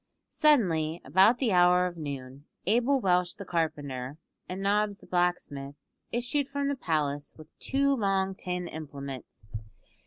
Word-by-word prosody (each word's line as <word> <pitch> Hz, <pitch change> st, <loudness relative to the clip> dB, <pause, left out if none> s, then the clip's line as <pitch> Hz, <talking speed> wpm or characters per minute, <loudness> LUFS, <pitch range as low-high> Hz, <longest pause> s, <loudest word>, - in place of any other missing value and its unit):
Suddenly, 175 Hz, -, +3 dB
about 190 Hz, -, +5 dB
the 245 Hz, -4 st, +1 dB
hour 180 Hz, 0 st, +5 dB
of 180 Hz, -1 st, -3 dB
noon, 140 Hz, -3 st, -7 dB, 0.2 s
Abel 245 Hz, +7 st, +3 dB
Welsh 180 Hz, -4 st, +2 dB
the 200 Hz, -, -8 dB
carpenter, 145 Hz, -6 st, -2 dB, 0.3 s
and 185 Hz, +1 st, -4 dB
Nobbs 205 Hz, +1 st, +1 dB
the -, -, -17 dB
blacksmith, 165 Hz, -6 st, -1 dB, 0.4 s
issued 250 Hz, +4 st, 0 dB
from 280 Hz, 0 st, -1 dB
the 285 Hz, -, 0 dB
palace 145 Hz, -, -2 dB
with 155 Hz, -1 st, -13 dB
two 280 Hz, +1 st, +2 dB
long 195 Hz, -4 st, +1 dB
tin 180 Hz, -1 st, -4 dB
implements. 140 Hz, -, -8 dB
180 Hz, 135 wpm, -29 LUFS, 150-210 Hz, 0.4 s, about